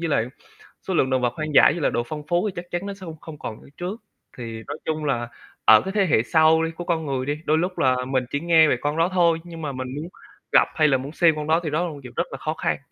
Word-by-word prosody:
với 165 - -2
lại 115 -6 +1 0.6
số 190 - -1
lượng 135 -6 +2
đồng 130 -1 +1
vật 120 -1 0
hoang 155 -1 -4
dã - - +8
với 165 +2 +3
lại - - +2
độ 120 - 0
phong 150 -1 -6
phú 175 +5 +1
thì - - -9
chắc 175 0 -8
chắn 175 +3 -3
nó 200 - -4
sẽ 195 - -16
không 165 -3 -8
không 155 -3 -10
còn 110 - -7
như - - -16
trước. 190 +6 -5 0.4
Thì 115 -2 -7
nói 145 +2 -5
chung 155 -1 -2
là 120 -4 -1 0.4
ở 110 -1 +8
cái 190 - -4
thế 200 -2 +3
hệ 115 -8 +3
sau 160 +2 +4
đi, 165 - -1
của 175 +2 -7
con 165 -2 -1
người 130 -2 -2
đi, 145 +2 -2
đôi 155 - +3
lúc 180 +3 -2
là 130 -1 +3
mình 130 -1 0
chỉ 140 - 0
nghe 160 -1 +5
về 125 - +2
con 150 +2 -1
đó 165 +2 +3
thôi 170 -2 +3
nhưng 170 -2 -9
mà 150 -2 -3
mình 130 -1 -5
muốn 160 +4 -5 0.4
gặp - - +5
hay 155 -1 +4
là 135 -2 +3
muốn 135 +3 -7
xem 165 -1 +3
con 150 0 -4
đó 160 +2 +3
thì 155 - -2
đó 155 +4 0
là - - -4
một 145 - -10
chuyện 125 -1 -10
rất - - -1
là 135 - -5
khó 155 +3 -3
khăn. - - -1
155 Hz, 310 wpm, -23 LUFS, 135-170 Hz, 0.6 s, dã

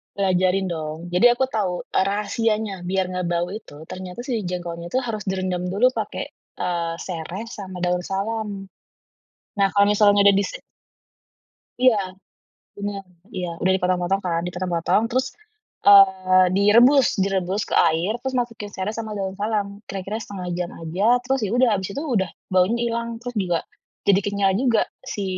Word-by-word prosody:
Pelajarin 185 -1 +1
dong. 155 -2 -4
Jadi 180 +8 +5
aku 260 +2 +1
tau 200 -8 -2
rahasianya, 205 0 0
biar 185 +1 0
nggak 180 -1 -3
bau 175 0 0
itu, 160 -7 -10
ternyata 185 +2 -8
si 230 -5 -1
jengkolnya 175 -1 -5
itu 260 - +2
harus 215 -3 -3
direndam 185 -2 -2
dulu 220 +6 +4
pakai, - - -4 0.3
eee, 170 -2 -1
sereh 175 +4 -5
sama 190 -5 -8
daun 180 0 0
salam. 200 0 -3 0.9
Nah 195 -1 +4
kalau 200 0 +5
misalnya 205 -1 +5
udah 200 -1 +7
di 200 - +2
si - - -7 1.2
Iya. 255 -3 +5 0.8
Benar. 200 -1 -4 0.3
Iya. 180 -2 -3
Udah 190 - +3
dipotong-potong 180 +1 0
kan, 170 -2 0
dipotong-potong 180 +2 0
terus, 255 +2 0 0.6
eee, 190 -2 +7
direbus, 240 +7 +6 0.2
direbus 195 +1 0
ke - - -10 0.2
air, 165 +6 0
terus 265 0 -4
masukin 230 -4 -3
sereh 200 +1 -4
sama 220 -2 -5
daun 190 -1 -3
salam. 205 -2 -2
Kira-kira 195 +3 -4
1/2 190 -4 -6
jam 175 -1 -2
aja, 165 +5 -3 0.2
terus 265 0 0
ya - - -4
udah, 250 -1 +4
habis 190 -2 -1
itu 285 - -2
udah 225 -10 0 0.2
baunya 185 +5 +3 0.2
ilang, 235 0 -2
terus 245 0 -5
juga, 175 -3 0 0.4
jadi 200 -1 +4
kenyal 200 -1 +1
juga, 235 -5 +3 0.2
si 205 -6 -4
195 Hz, 155 wpm, -23 LUFS, 180-215 Hz, 1.2 s, udah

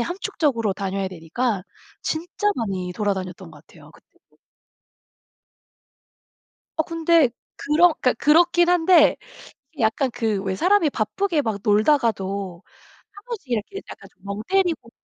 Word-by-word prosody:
함축적으로 290 - -1
다녀야 195 0 -3
되니까 185 +5 -2 0.4
진짜 350 +6 -2
많이 190 -6 -3
돌아다녔던 190 -3 -3
것 150 -1 -17
같아요 - - -17
그때도. - - -27 2.4
어 - - +4
근데 330 -3 +3 0.3
그런 325 +4 +4
그러니까 250 - +3
그렇긴 345 +3 +5
한데 350 -2 +5 0.6
이게 290 -6 -5
약간 235 +4 +1
그 225 -4 -1
왜 190 -1 -1
사람이 360 - +3
바쁘게 305 - -1
막 220 -5 -2
놀다가도 200 - +1 0.5
1 405 -1 -14
번씩 430 - -7
이렇게 235 - -2
약간 - - -12
좀 - - -35
멍 200 +1 -4
때리고 360 -10 0
245 Hz, 280 characters per minute, -22 LUFS, -, 2.4 s, 그렇긴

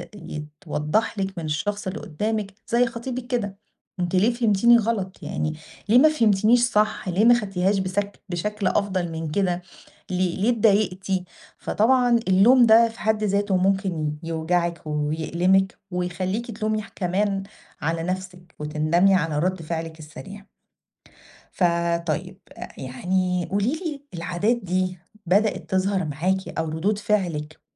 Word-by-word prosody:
يتوضح 150 +4 -3
لِك 195 -1 -3
من 165 - -4
الشخص 190 +7 -2
اللي 190 +3 -4
قدامِك، 210 +3 -3
زي 240 +1 +3
خطيبِك 245 +1 -5
كده، 205 -6 -2 0.4
أنتِ 175 +1 -1
ليه 210 +6 +3
فهمتيني 235 0 +4
غلط، 210 -4 -2
يعني 155 0 -2 0.4
ليه 230 - +6
ما 305 +5 +7
فهمتنيش 225 -4 +3
صح، 215 -3 +1
ليه 190 +5 +2
ما 240 - +8
خدتيهاش 195 -1 0
بسك 200 +2 -3
بشكل 200 +3 -2
أفضل 185 -5 0
من 160 -1 -4
كده، 180 -1 0 0.5
ليه 180 -1 0
ليه 210 +5 +1
اتضايقتي. 195 -4 +1 0.3
فطبعًا 245 +1 +3
اللوم 230 +7 +6
ده 230 +1 +7
في 225 - -14
حد 215 0 0
ذاته 200 -1 +1
ممكن 185 -5 0
يوجعِك 170 +1 -1
ويألمِك 165 +6 +1
ويخلّيكِ 185 +6 -2
تلومي 215 0 -2
كمان 195 +2 0 0.4
على 165 +2 -1
نَفسِك 180 -1 -5
وتندمي 155 +6 +2
على 165 -5 0
رد 185 +1 0
فعلِك 160 0 -5
السريع. 195 +6 -10 1.1
فطيب، 170 0 0 0.4
يعني 180 +7 -1
قولي 205 +6 +1
لي، 315 -4 -5
العادات 180 +7 0
دي 185 -3 -2 0.3
بدأت 205 +5 +1
تظهر 190 0 +1
معاكِ 180 +6 -1
أو 160 - -1
ردود 190 +7 -1
فعلِك 170 -8 -1
190 Hz, 130 wpm, -24 LUFS, 170-210 Hz, 1.1 s, ما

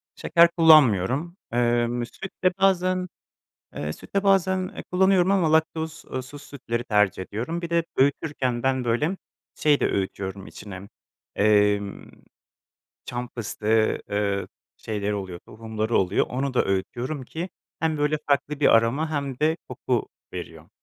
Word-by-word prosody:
Şeker 170 0 +5
kullanmıyorum. 155 - +5
Emm, 120 0 +1
süt 190 +10 -9
de 185 - +4
bazen 185 -1 +2 0.7
Eee, 75 +1 -3
süt - - -14
de 200 - +2
bazen 190 -1 +1
kullanıyorum 190 0 +4
ama 180 -6 +3
laktoz 160 0 0
eee, 130 - -2
suz 145 +3 -11
sütleri 120 -4 -4
tercih 105 -4 +2
ediyorum. 125 - -4
Bir 170 - -5
de 170 -1 +2
öğütürken 135 -3 0
ben, 130 -1 +1
böyle, 145 +11 0 0.4
şey 150 -2 +2
de - - +3
öğütüyorum 95 0 -3
içine, 100 -1 -10 0.5
emm, 105 -1 +2 0.9
çam 120 0 -5
fıstığı, 110 -1 0
ııı, 100 -1 -1 0.3
şeyleri 105 -1 -3
oluyor, 95 -3 -5
tohumları 110 0 -3
oluyor. 95 +1 +2
Onu 130 +2 -2
da - - +3
öğütüyorum 120 +9 -2
ki 165 +8 -5 0.3
hem 160 -1 +1
böyle 150 +1 +1
farklı 145 +1 0
bir - - +4
aroma 135 +8 +1
hem 140 -4 -3
de 160 +1 +2
koku - - -2 0.2
veriyor. - - -8
130 Hz, 140 wpm, -25 LUFS, 110-160 Hz, 0.9 s, Şeker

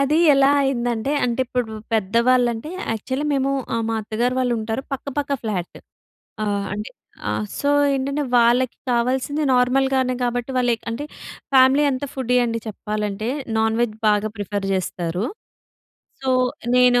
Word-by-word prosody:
అది 280 +2 +2 0.2
ఎలా 275 0 +5
అయిందంటే, 245 -2 0
అంటే 240 +1 0
ఇప్పుడు 245 -2 -2 0.2
పెద్దవాళ్ళంటే 235 +4 +2 0.2
యాక్చువల్లీ 260 +6 -3
మేము 270 0 +1 0.4
మా 225 - 0
అత్తగారు 230 +4 -1
వాళ్ళు 250 -1 +1
ఉంటారు, 220 +3 -3
పక్క 275 +1 -4
పక్క 285 -1 -1
ఫ్లాట్. 195 -6 -3 0.7
ఆహ్, 200 -1 -1
అంటే 210 +1 -5 0.4
ఆహ్, 210 - -2
సో 285 - 0 0.3
ఏంటంటే 275 +2 -1
వాళ్ళకి 240 +1 +3
కావాల్సింది 255 +5 0
నార్మల్‌గానే 260 +1 +2
కాబట్టి 245 +1 -2
వాళ్ళు 245 -1 +2 0.2
అంటే 230 +6 -4 0.5
ఫ్యామిలీ 265 +3 +6
అంత 260 +2 -3
ఫుడ్డీ 250 -2 0
అండి 230 -1 -2
చెప్పాలంటే, 210 0 -3 0.3
నాన్ 220 0 +1
వెజ్ 215 -3 -1
బాగా 210 +1 +2
ప్రిఫర్ 205 -1 -3
చేస్తారు. 180 0 -2 1.0
సో 265 - -3 0.5
నేను 250 -1 +5
245 Hz, 135 wpm, -22 LUFS, 220-260 Hz, 1.0 s, ఫ్యామిలీ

